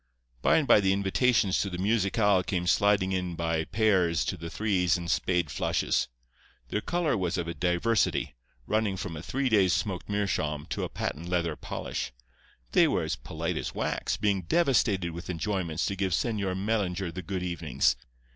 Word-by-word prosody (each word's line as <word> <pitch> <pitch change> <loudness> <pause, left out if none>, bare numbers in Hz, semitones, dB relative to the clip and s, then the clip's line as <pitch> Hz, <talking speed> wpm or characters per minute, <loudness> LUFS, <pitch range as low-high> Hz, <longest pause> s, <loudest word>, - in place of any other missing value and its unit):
"By - - +4
and 155 -4 +1
by - - +7
the 95 -1 +3
invitations 100 +1 +2
to 100 - -2
the 90 - -5
musicale 100 0 +2
came 90 -1 -2
sliding 100 0 +3
in 90 -2 -2
by 80 -1 -1
pairs 95 -7 +2
and 85 +1 -7
threes 95 -5 +1
and 85 0 -3
spade 90 -5 +1
flushes. - - 0 0.6
Their 105 - -1
colour 170 -3 0
was 95 -2 -1
of 85 -1 -2
a 85 - -3
diversity, 90 - +1 0.3
running 110 - 0
from 90 -3 -5
a 75 - -6
three 135 +9 -1
days' 100 -6 +4
smoked 95 -4 -3
meerschaum 75 -8 -1
to - - -2
a - - -3
patent 85 +3 -4
leather 85 -3 0
polish. - - -4 0.6
They - - +5
were - - 0
as - - -1
polite 80 +6 -4
as - - -4
wax, - - -1
being 100 -3 +1
devastated 100 - +2
with 85 +3 -8
enjoyments 90 -1 -1
to 100 - -1
give 95 -2 -1
Señor 100 -2 0
Mellinger 95 -3 -1
the 95 - -5
good 90 +1 -4
evenings. 85 -3 +1
95 Hz, 175 wpm, -28 LUFS, 85-105 Hz, 0.6 s, by